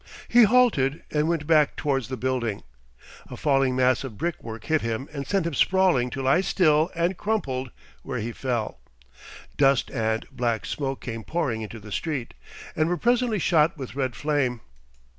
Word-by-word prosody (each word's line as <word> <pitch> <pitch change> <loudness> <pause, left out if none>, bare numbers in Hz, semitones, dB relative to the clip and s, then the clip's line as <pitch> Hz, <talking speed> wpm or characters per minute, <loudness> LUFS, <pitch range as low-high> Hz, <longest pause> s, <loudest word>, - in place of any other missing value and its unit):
He 240 -1 +6
halted, 210 - +3
and 150 0 +1
went 165 -3 -1
back 155 -2 +3
towards 135 -5 -1
the 130 0 -5
building. 120 -4 -2 0.7
A - - -8
falling 135 -3 +2
mass 130 0 +2
of 120 -6 -7
brick 170 +1 -3
work 110 -1 -7
hit 155 -1 +1
him 115 +4 -3
and 140 -2 -5
sent 195 -4 0
him 170 - -2
sprawling 175 -6 +3
to 135 +1 -5
lie 135 +7 +4
still 160 -4 +3
and 170 +3 0
crumpled 135 - -2 0.3
where - - -5
he 115 +3 -3
fell. 120 -3 -3 0.8
Dust 135 -2 +3
and 110 -3 -1
black 120 -2 -1
smoke 135 -2 -3
came 115 -2 -6
pouring 130 -8 -2
into 110 +1 -7
the 105 0 -12
street, 140 -5 -3 0.4
and 155 +1 +1
were 175 - 0
presently 240 0 +1
shot 165 -3 +2
with 130 -3 -7
red 130 -4 -2
flame.... 135 -3 -1
135 Hz, 175 wpm, -25 LUFS, 125-165 Hz, 0.8 s, He